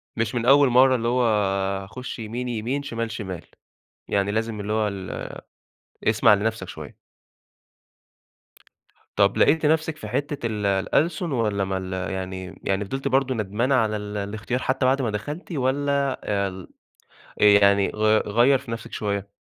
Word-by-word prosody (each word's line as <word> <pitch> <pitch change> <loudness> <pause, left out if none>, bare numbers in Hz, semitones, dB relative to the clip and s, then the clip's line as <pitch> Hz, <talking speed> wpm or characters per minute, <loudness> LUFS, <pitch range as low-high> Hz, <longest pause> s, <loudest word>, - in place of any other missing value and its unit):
مش 115 +1 -1
من 120 -1 -1
أول 140 +1 +6
مرّة، 130 +1 +5
اللي 115 -1 -1
هو 125 +1 +2 0.6
هاخش 115 +6 -8
يمين، 115 +3 -4
يمين، 120 +4 -2
شِمال، 115 -4 -4
شِمال، 95 -7 -6 0.6
يعني 100 0 0
لازم 110 0 -2
اللي 105 +1 -3
هو 110 -1 +1
ال 95 -2 -6 0.7
اسمع 110 0 +5
لنفْسك 110 +2 -1
شويّة. - - -9 2.2
طَب - - +3
لقيتِ 160 -1 +4
نفْسِك 155 0 +1
في - - -8
حِتّة 145 -2 -3
ال 105 -2 -3
الألسُن 150 - +1
والّا 105 -6 0
ما 95 0 -2
ال 95 0 -5 0.2
يعني 95 -1 -6
يعني 95 +1 -1
فضِلتِ 135 +6 -4
برضه 130 -1 +1
ندمانة 110 +6 0
على 110 -4 +1
ال 105 0 -6
الإختيار 105 +5 -3
حتى 130 0 0
بعد 135 +2 +3
ما 120 - 0
دخَلتِ 145 - -6
والّا 140 -1 0
آآ 100 -1 0
ال 95 -1 -8 0.7
آآ - - +5
يعني 100 -1 +5
غي 110 0 +3
غيّر 120 +7 +3
في 125 -2 -11
نفْسِك 115 - -6
شويّة؟ 100 -1 -3
115 Hz, 155 wpm, -24 LUFS, 100-130 Hz, 2.2 s, أول